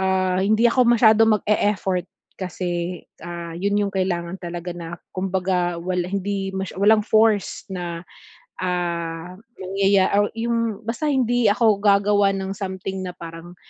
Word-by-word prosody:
ah, 185 -1 +1
hindi 220 +4 +3
ako 250 +1 +3
masyadong 225 -2 +5
mag-e-effort 200 -3 0 0.3
kasi, 180 -1 -4 0.2
ah, 170 -1 -6
'yun 200 +3 0
'yung 200 -1 -1
kailangan 180 -2 -1
talaga 175 0 -5
na 170 0 -7 0.2
kumbaga 185 -2 -1
wala 180 0 -1
hindi 195 0 -2
masya 190 -1 -4
walang 215 +1 +5
force 215 -2 +2
na, 175 -2 -5 0.6
ah, 170 -1 -3 0.3
mangyaya 195 0 +2
o 205 - +2
'yung 230 -2 -1
basta 240 +7 -2
hindi 245 -4 +2
ako 215 -1 +3
gagawa 200 0 +4
ng 190 0 -4
something 190 -1 -5
na 180 - -5
parang, 165 +1 -10
190 Hz, 135 wpm, -22 LUFS, 175-210 Hz, 0.6 s, masyadong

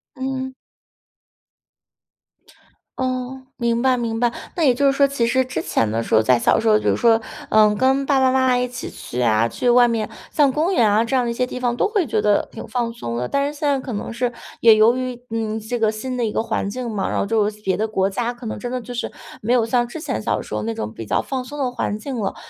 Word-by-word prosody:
嗯。 260 0 -4 2.4
哦， 255 0 -3 0.2
明 235 -1 0
白 260 -1 +3
明 230 -2 -2
白。 240 0 +2 0.2
那 345 - -2
也 275 - +6
就 280 +3 +1
是 275 - +5
说 280 +1 +3
其 275 -4 0
实 260 +2 +2
之 160 -11 -4
前 110 - 0
的 115 +2 -1
时 - - -5
候， 110 - +6
在 125 +2 +4
小 - - +3
时 225 - -1
候 215 - +6
就 - - +1
是 - - +1
说， 230 -1 +4 0.3
嗯， 215 -1 +5
跟 265 +4 +2
爸 275 -1 +3
爸 260 -1 +4
妈 260 0 +2
妈 250 - +4
一 250 0 0
起 245 0 -7
去 125 - -7
啊， 115 -2 +3
去 245 - -3
外 245 0 +6
面， 225 -2 -1 0.2
像 290 -3 +3
公 310 +7 0
园 235 - +4
啊 210 +2 +3
这 230 +3 -1
样 250 -2 +2
的 235 - -1
一 - - -2
些 250 +2 -1
地 250 - -6
方 245 -1 0
都 245 - +1
会 410 -5 0
觉 240 - 0
得 205 -1 +2
挺 - - -8
放 235 -2 -2
松 120 - -5
的， 125 +1 -2
但 280 0 0
是 295 - -13
现 300 - 0
在 280 -1 +2
可 255 -3 -6
能 210 - -4
是 245 +1 -1 0.3
也 225 -2 +8
由 220 +3 +5
于， 255 -1 -4
嗯， 220 -1 -2
这 220 +3 -4
个 220 -1 +2
新 250 +4 -5
的 245 - -1
一 220 - 0
个 - - -1
环 200 - -2
境 240 +2 -4
嘛， 200 -3 -2
然 - - -2
后 - - 0
就 215 0 +1
是 210 - -13
别 190 -2 +1
的 220 +1 -1
国 195 -3 +1
家 240 +4 -1
可 240 0 -11
能 220 - -4
真 245 - -5
的 255 - -2
就 245 +1 -8
是， 240 - -3 0.3
没 230 +4 +1
有 240 -3 +3
像 240 +1 +1
之 310 - -7
前 110 - -3
小 - - 0
的 - - -5
时 - - -9
候 105 - -1
那 110 +2 -2
种 110 +1 -5
比 115 - -8
较 - - +1
放 260 -2 -3
松 290 +3 -9
的 265 -3 -1
环 210 -3 -2
境 255 +4 -5
了。 200 -3 -2
240 Hz, 295 characters per minute, -21 LUFS, 215-260 Hz, 2.4 s, 也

